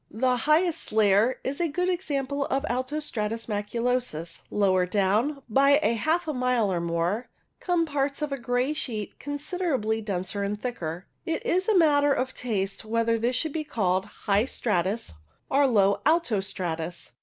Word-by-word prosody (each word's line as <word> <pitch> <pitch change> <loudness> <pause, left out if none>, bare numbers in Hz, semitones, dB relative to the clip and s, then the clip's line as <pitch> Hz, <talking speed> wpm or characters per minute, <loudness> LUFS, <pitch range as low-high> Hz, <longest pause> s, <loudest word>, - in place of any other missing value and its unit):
The 255 +3 +1
highest 310 +6 +1
layer 215 +3 +3
is 280 +5 -2
a 340 - +2
good 360 +4 -1
example 285 -6 -1
of 275 +2 -1
alto 255 +5 -1
stratus 225 -6 -3
maculosus. 210 -5 -2
Lower 185 -3 +2
down, 215 +9 +1
by 275 +5 +4 0.2
half 315 +9 0
a 305 - -1
mile 250 -6 +1
or 170 - -1
more, 170 +7 -1 0.3
come 350 -2 +1
parts 285 -1 -1
of 300 - -2
a 275 - -1
grey 245 +4 0
sheet 225 -9 -5
considerably 290 - -2
denser 200 -1 -3
and 200 +1 -2
thicker. 180 -8 -4 0.2
It 325 - -2
is 370 +2 +1
a 425 - +4
matter 290 -4 +4
of 260 0 -2
taste 200 -5 -2
whether 230 +1 +1
this 240 +3 0
should 310 +3 -1
be 315 - -2
called 190 -8 0 0.2
high 205 +2 +3
stratus 205 - -1 0.4
or 280 +1 +4
low 200 -5 +3
alto 310 - +2
stratus. 175 -3 -4
245 Hz, 160 wpm, -26 LUFS, 205-285 Hz, 0.4 s, by